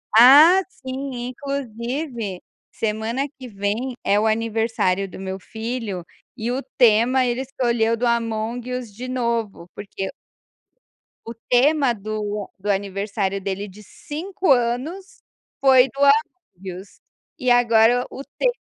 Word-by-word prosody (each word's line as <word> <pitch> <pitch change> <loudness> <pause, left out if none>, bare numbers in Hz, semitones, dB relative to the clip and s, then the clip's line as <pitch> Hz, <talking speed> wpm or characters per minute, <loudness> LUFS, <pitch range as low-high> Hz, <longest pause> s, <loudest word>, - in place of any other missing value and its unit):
Ah, 295 +10 +9
sim, 260 -4 -6
inclusive, 245 - -4 0.3
semana 225 +5 -2
que 255 - -8
vem 215 +4 -3
é 205 - +3
o 220 - +1
aniversário 220 -4 0
do - - -10
meu 190 0 -5
filho 220 -5 -5 0.3
e 235 +2 -2
o 260 - -2 0.2
tema 245 +2 +4
ele 245 +1 -1
escolheu 235 -4 0
do 245 - -1
Among 235 +1 -1
Us, 250 -4 -5
de 250 +4 -7
novo, 235 -8 -2
porque 195 -1 -5 1.2
o 230 - -6 0.2
tema 270 +1 +4
do 210 -1 -4
do 205 - -4
aniversário 200 0 -1
dele 195 +1 -4
de 200 +2 -13
5 335 - -3
anos 260 +10 -1 0.4
foi 265 -1 +6
do 275 +1 -7
Among 280 - 0
Us, 200 - -19 0.4
e 255 - 0
agora 240 0 +4
o 275 - -7
tema - - +3
235 Hz, 130 wpm, -22 LUFS, 210-260 Hz, 1.2 s, Ah